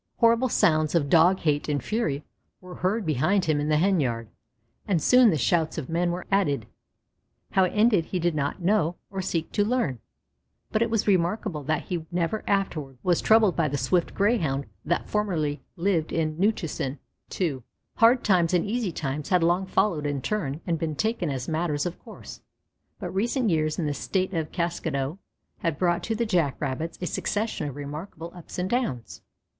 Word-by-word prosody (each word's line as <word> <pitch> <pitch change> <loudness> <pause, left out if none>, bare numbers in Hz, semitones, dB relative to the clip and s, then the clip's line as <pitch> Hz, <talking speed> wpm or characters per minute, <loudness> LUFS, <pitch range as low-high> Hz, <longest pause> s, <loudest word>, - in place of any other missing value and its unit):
Horrible 230 +2 +4
sounds 155 -8 +2
of 145 -4 +1
Dog 175 +3 +5
hate 150 -1 0
and 145 -4 -1
fury 155 -11 -1 0.4
were 180 -1 -11
heard 195 +4 -1
behind 155 +6 +2
him 155 -2 +1
in 145 +1 -1
the 150 - +3
hen 190 +3 +3
yard, 115 -5 -2 0.6
and 190 -5 +2
soon 250 - +6
the 160 - +1
shouts 160 +3 +1
of 150 -5 -4
men 170 +2 +1
were 175 +1 -3
added. 145 - +1 0.9
How 190 - +4
it - - -1
ended 210 -5 +4
he 185 - -3
did 175 -1 +1
not 145 +4 -2
know 180 -3 +2 0.2
or 195 -1 -3
seek 170 -3 -2
to 205 - +2
learn, 210 - 0 0.7
but 215 - +1
it 230 - +2
was 225 -1 +1
remarkable 185 -2 +1
that 155 +1 0
he 170 -3 -4
never 175 +5 -1
afterward 155 -9 -1
was 175 -2 +2
troubled 220 -4 +4
by 165 -3 +2
the 145 0 -2
swift 165 +7 0
Greyhound 165 - +1 0.2
that 175 - -1
formerly 165 -9 -1
lived 170 -3 0
in 155 -2 0
Newchusen. 165 -9 -1 0.4
II 155 -8 0 0.4
Hard 235 +2 +5
times 180 -3 +3
and 175 - +2
easy 220 -2 -1
times 145 0 -4
had 180 -3 +3
long 175 +3 +2
followed 165 -7 +1
in 140 -3 -3
turn 160 -8 -2
and 165 -3 -1
been 155 -2 -2
taken 220 -3 -1
as 130 -3 -3
matters 155 -2 -1
of 175 0 -4
course; - - -11 0.6
but - - -5
recent 230 +3 +1
years 155 -1 +1
in 170 - -1
the 145 - 0
State 185 +5 -1
of 160 -3 -2
Kaskado 165 -3 -2 0.4
had 165 -3 -1
brought 175 -2 +1
to 225 - -1
the 235 +2 0
Jack 170 - +1
rabbits 150 +4 -3
a - - -2
succession 205 -4 -2
of 135 - -9
remarkable 155 +4 -7
ups 175 -2 -10
and 180 0 -1
downs. 190 - -2
170 Hz, 185 wpm, -26 LUFS, 150-200 Hz, 0.9 s, soon